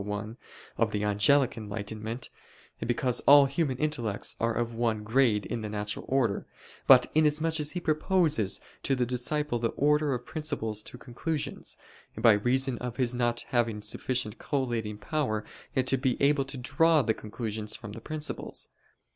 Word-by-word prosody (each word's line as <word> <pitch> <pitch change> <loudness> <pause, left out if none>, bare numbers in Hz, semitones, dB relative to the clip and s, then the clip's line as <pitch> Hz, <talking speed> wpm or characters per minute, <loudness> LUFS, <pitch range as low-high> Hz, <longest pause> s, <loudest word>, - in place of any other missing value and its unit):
1) 105 +2 -4 0.4
of - - +2
the 105 0 -1
angelic 115 +6 +3
enlightenment, 110 +2 -6 0.6
because 125 0 +1
all 145 0 +9
human 135 -1 -1
intellects 120 -9 -1
are 115 0 0
of 120 0 -1
one 115 -2 0
grade 110 -2 +2
in 120 -2 -3
the 105 - -4
natural 105 0 -4
order; 120 -7 0 0.4
but 130 -2 +8
inasmuch 155 +1 +2
as 150 0 -1
he 180 - -2
proposes 155 - +1 0.2
to 135 - +1
the 125 -1 +1
disciple 125 +2 -1
the 115 0 0
order 150 +1 +3
of 125 0 -7
principles 150 -9 -2
to 125 - -8
conclusions, 140 +4 -3 0.4
by 115 -2 +6
reason 125 +4 +1
of 125 -1 -5
his 125 -2 +1
not 120 -1 0
having 115 -3 +1
sufficient 120 +1 -3
collating 120 -7 -2
power 110 -5 -2 0.4
to 135 +1 +2
be 130 -1 0
able 140 -1 +3
to 135 0 -6
draw 150 +4 +3
the 110 - +1
conclusions 110 -1 -5
from 110 -5 -9
the 110 - -9
principles. 155 +3 -5
125 Hz, 155 wpm, -29 LUFS, 110-145 Hz, 0.6 s, all